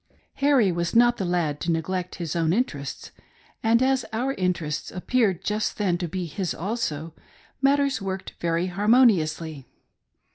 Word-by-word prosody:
Harry 275 -8 +4
was 170 +1 -2
not 240 +1 +5
the 190 - -2
lad 170 -5 0
to 170 - -3
neglect 180 +3 -2
his 170 -3 -4
own 165 -1 +2
interests, 150 - -3 0.5
and 230 +2 +3
as 265 -1 +2
our 250 +5 -1
interests 175 - -2
appeared 190 -2 0
just 210 +2 -1
then 195 -5 +1
to 175 0 -3
be 180 +2 -3
his 170 +2 -3
also, 165 -5 -3 0.5
matters 280 -2 +2
worked 190 -1 -5
very 170 +1 0
harmoniously. 180 - +2
185 Hz, 145 wpm, -25 LUFS, 165-230 Hz, 0.5 s, not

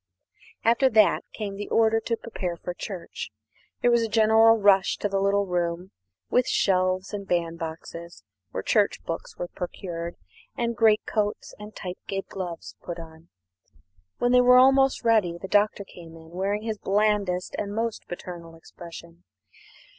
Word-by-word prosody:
After 235 +4 +4
that 215 -3 +4
came 200 -3 -5
the 205 - -6
order 225 0 +3
to 230 +1 -2
prepare 180 -7 -5
for 175 - -5
church. 180 -1 -7 0.5
There 245 - +5
was 235 0 +4
a 225 - -1
general 225 +1 +5
rush 200 -2 +4
to - - -1
the 195 -1 -1
little 200 +1 +2
room 175 0 -2 0.4
with 250 - +2
the - - -4
shelves 185 0 +1
and 200 -1 -5
bandboxes, 170 0 -4 0.3
where - - -5
church - - +1
books - - -6
were 175 - -4
procured, 170 -1 -6 0.4
and 235 -1 -1
great 220 -1 +4
coats 210 -1 -2
and 210 0 -10
tight 180 -1 -6
kid 195 -1 -3
gloves 175 -3 -6
put 175 - -6
on. 160 0 -12 0.9
When 245 - +1
they 250 0 +6
were 250 0 +7
almost 270 +1 +5
ready 215 -7 +3
the 190 - -6
Doctor 205 0 +2
came 170 -4 -13
in, 160 0 -14
wearing 200 +4 -2
his 220 -2 -3
blandest 200 -3 +1
and 200 - -3
most 225 +1 -3
paternal 170 -2 -8
expression. 170 +1 -12
195 Hz, 160 wpm, -26 LUFS, 175-220 Hz, 0.9 s, were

